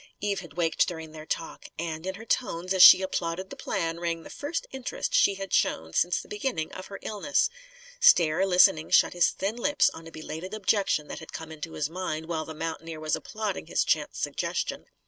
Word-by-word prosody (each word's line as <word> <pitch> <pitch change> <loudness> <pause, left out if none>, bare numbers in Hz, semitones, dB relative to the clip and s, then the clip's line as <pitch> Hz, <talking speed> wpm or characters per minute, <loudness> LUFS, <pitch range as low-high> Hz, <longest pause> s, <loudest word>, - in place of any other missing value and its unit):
Eve 200 -1 -1
had 170 -6 -11
waked, 165 0 +1
during 160 -4 -6
their 155 0 -10
talk. - - -4
And, 160 +1 -4
in 190 - -3
her 220 +3 -10
tones, 185 -7 -1
as 190 - +3
she 190 - +10
applauded 185 0 -3
the - - -6
plan, 165 0 -2
rang 170 -1 -2
the - - -11
first 295 +4 -4
interest 265 - -4
she 200 - +4
had 195 -1 -6
shown 80 0 +1
since 175 - +2
the - - -10
beginning 210 -7 -3
of 185 - -8
her 200 - -8
illness. 220 - 0 0.5
Stair, 190 - +5
listening, 180 -4 +5
shut - - +5
his 175 -1 +4
thin 200 +4 -3
lips 290 +4 +2
on 165 0 -11
a - - -11
belated 165 +5 -7
objection 195 -7 +1
that - - -6
had 160 - -12
come 160 0 -7
into 160 +1 -7
his 150 - -1
mind 160 -2 -4
while 160 -1 -3
the 160 - -8
mountaineer 165 0 -5
was 155 0 0
applauding 215 -2 -4
his - - +1
chance - - 0
suggestion. - - -3
175 Hz, 205 wpm, -27 LUFS, 160-200 Hz, 0.5 s, she